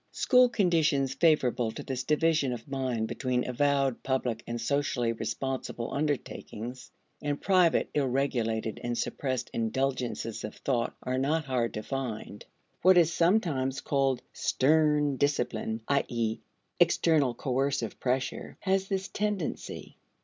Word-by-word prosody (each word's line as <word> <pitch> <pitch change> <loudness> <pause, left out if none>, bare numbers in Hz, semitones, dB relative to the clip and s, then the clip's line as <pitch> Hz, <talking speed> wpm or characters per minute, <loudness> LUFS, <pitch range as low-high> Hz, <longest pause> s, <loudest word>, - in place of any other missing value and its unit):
School 250 -1 +5
conditions 160 - +2
favorable 135 -6 +2
to - - -7
this 130 -1 -3
division 150 -3 +2
of 120 +2 -8
mind 130 -5 -1
between 125 -1 -1
avowed, 135 0 +1
public, 125 -4 -1
and 120 0 -3
socially 125 -1 0
responsible 115 +1 -4
undertakings, 130 -4 -4 0.3
and 145 -1 -2
private, 185 -4 +3
ill 145 -3 +1
regulated, 115 -4 -1
and 120 0 -2
suppressed 130 -3 -2
indulgences 120 -1 -2
of 105 - -6
thought 120 -4 -1
are 130 +1 -1
not 150 +4 +1
hard 125 -4 -1
to 105 - -4
find. 115 -5 -5 0.4
What 185 +1 +6
is 170 -1 +5
sometimes 160 -8 +1
called 135 -2 0
"stern 150 -1 +2
discipline," 125 -5 -1
i.e., 120 -5 0 0.4
external 145 -7 +3
coercive 130 -4 -1
pressure, 130 +1 -2
has 195 0 +1
this 195 -1 -2
tendency. 205 -5 -3
135 Hz, 125 wpm, -29 LUFS, 120-150 Hz, 0.4 s, What